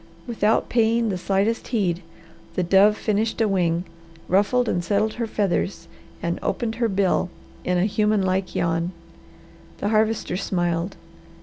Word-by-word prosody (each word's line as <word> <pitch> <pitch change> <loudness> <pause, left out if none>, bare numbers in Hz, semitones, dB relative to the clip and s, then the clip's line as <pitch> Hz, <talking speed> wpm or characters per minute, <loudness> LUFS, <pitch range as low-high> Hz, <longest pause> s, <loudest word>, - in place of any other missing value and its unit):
Without 225 -2 +1
paying 230 -1 +2
the 190 - -1
slightest 200 +5 0
heed, 190 -7 0 0.5
the 185 - +1
dove 195 +4 +5
finished 220 +2 0
a 225 - +3
wing, 175 -3 +1 0.4
ruffled 210 +6 +2
and 175 - 0
settled 210 +4 +1
her 230 -1 -3
feathers, 190 -4 -1 0.4
and 170 0 -1
opened 225 -2 -1
her 230 - +3
bill 190 -2 +1 0.3
in 180 0 +1
a 175 - +2
human 210 -1 +2
like 185 0 -1
yawn. 170 +1 0 0.8
The 205 - -1
Harvester 215 -4 +1
smiled. 175 -1 -1
200 Hz, 140 wpm, -23 LUFS, 180-220 Hz, 0.8 s, dove